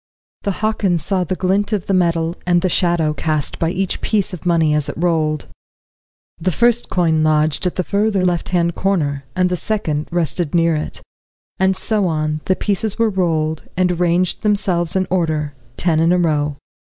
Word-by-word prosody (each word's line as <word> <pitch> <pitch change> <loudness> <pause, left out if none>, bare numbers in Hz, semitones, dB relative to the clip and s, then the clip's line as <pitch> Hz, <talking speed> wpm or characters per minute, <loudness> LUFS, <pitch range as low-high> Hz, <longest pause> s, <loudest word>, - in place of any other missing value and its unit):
The - - -2
Hockins 200 -6 +1
saw 185 +1 0
the 185 - -2
glint 195 +3 0
of 200 -4 -1
the 195 - -1
metal, 170 -2 +1
and 175 0 +3
the 185 - +2
shadow 170 -3 +1
cast 155 -1 -2
by 165 - +1
each 190 +1 -2
piece 205 -2 0
of 180 0 -6
money 165 -3 +3
as 150 -2 +1
it - - -6
rolled. 155 -3 0 0.9
The 175 - 0
first 240 +5 +2
coin 160 -3 +2
lodged 155 +2 +2
at 180 - -3
the 185 - 0
further 200 -1 +1
left 175 -2 0
hand 170 -1 +1
corner 150 -8 -1
and 185 0 +2
the 180 - 0
second 160 -7 -1
rested 170 -1 -1
near 165 -1 +3
it; 150 - -4 0.6
and 190 0 +2
so 210 -4 0
on, 155 -1 -1
the 185 - +2
pieces 205 +1 -1
were 230 -1 +2
rolled, 160 -4 -1
and 180 -2 +1
ranged 175 +1 +1
themselves 195 -6 0
in 190 0 +2
order, 155 -5 0 0.2
ten 165 -3 +1
in 165 +1 +3
a 180 - +4
row. 150 -4 0
175 Hz, 185 wpm, -19 LUFS, 160-190 Hz, 0.9 s, a